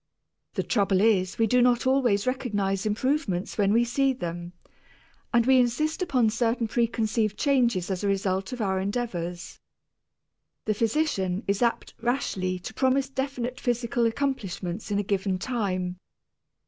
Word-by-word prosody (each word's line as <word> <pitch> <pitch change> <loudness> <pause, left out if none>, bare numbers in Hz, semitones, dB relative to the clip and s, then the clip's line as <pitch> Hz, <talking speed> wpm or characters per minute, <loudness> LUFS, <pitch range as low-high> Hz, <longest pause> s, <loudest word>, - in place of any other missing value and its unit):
The - - 0
trouble 200 -4 +2
is 195 -3 +2
we 225 - +3
do 250 +3 +3
not 245 0 +3
always 250 -6 +2
recognize 210 -6 -1
improvements 215 - -1
when 200 -1 +3
we 230 +2 +4
see 270 +3 +1
them, 175 -6 -6 0.8
and 235 -2 +3
we 260 0 +5
insist 305 +8 0
upon 255 -11 +2
certain 230 0 0
preconceived 220 -2 0
changes 235 - +1
as 185 +1 -3
a - - +1
result 195 +1 0
of 250 -2 -4
our 190 -2 0
endeavors. 185 -5 -4 1.1
The 215 - +1
physician 210 - 0
is 200 +2 0
apt 235 -1 0
rashly 200 -7 -1
to 180 +4 -8
promise 265 +2 +1
definite 265 -2 -3
physical 240 -1 0
accomplishments 220 -8 -3
in 205 - 0
a 205 - +1
given 195 -1 -1
time. 185 -5 -2
225 Hz, 145 wpm, -26 LUFS, 195-250 Hz, 1.1 s, we